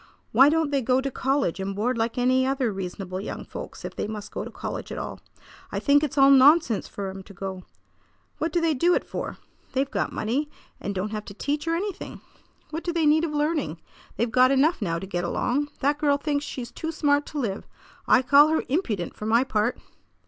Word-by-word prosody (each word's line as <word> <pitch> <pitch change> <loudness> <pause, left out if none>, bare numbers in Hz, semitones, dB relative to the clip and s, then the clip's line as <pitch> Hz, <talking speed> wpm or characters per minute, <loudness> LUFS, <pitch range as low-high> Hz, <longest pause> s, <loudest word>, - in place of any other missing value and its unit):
"Why 270 +2 +7
don't 315 -1 +1
they 280 -1 +2
go 255 +1 +2
to 270 +1 -2
college 265 - 0
and 195 0 -3
board 240 +5 0
like 230 +1 -1
any 255 +1 +3
other 260 -4 0
reasonable 185 0 -5
young - - -6
folks - - -8
if - - -6
they - - -2
must 210 -1 -6
go - - -4
to - - -7
college - - -6
at - - -5
all? - - -5 0.5
I - - -2
think 285 0 +4
it's 290 -1 -2
all 275 0 +7
nonsense 275 -3 +5
for 195 -1 -5
'em 190 0 -8
to 200 +1 -14
go. 190 0 -6 0.7
What 320 +1 -1
do 345 - +2
they 330 -1 +2
do 345 +6 +3
it - - 0
for? - - -5 0.4
They've 265 +1 0
got - - -1
money, 270 +7 -1 0.3
and 200 - -4
don't 195 +3 -2
have 215 -1 -4
to 200 - -10
teach 295 +7 -2
or 330 - +2
anything. 390 +2 -4 0.5
What 320 +2 -4
do 345 - -1
they 335 -2 +1
need 305 +2 +4
of 305 - -4
learning? 295 - -1 0.4
They've 235 0 0
got 255 +1 +5
enough 275 +4 +3
now 165 -5 0
to 170 - -5
get 175 -2 -3
along. 265 +11 0
That 290 +2 +1
girl 290 -2 +3
thinks 290 0 -1
she's 240 -4 -6
too 320 +5 -4
smart 290 -2 +1
to 300 - -4
live. 210 -6 -3 0.4
I 260 - +5
call 285 +3 +7
her 315 0 +1
impudent, 230 - -1
for 210 - -5
my 230 +3 +4
part!" 220 -2 0
265 Hz, 220 wpm, -25 LUFS, 210-295 Hz, 0.7 s, Why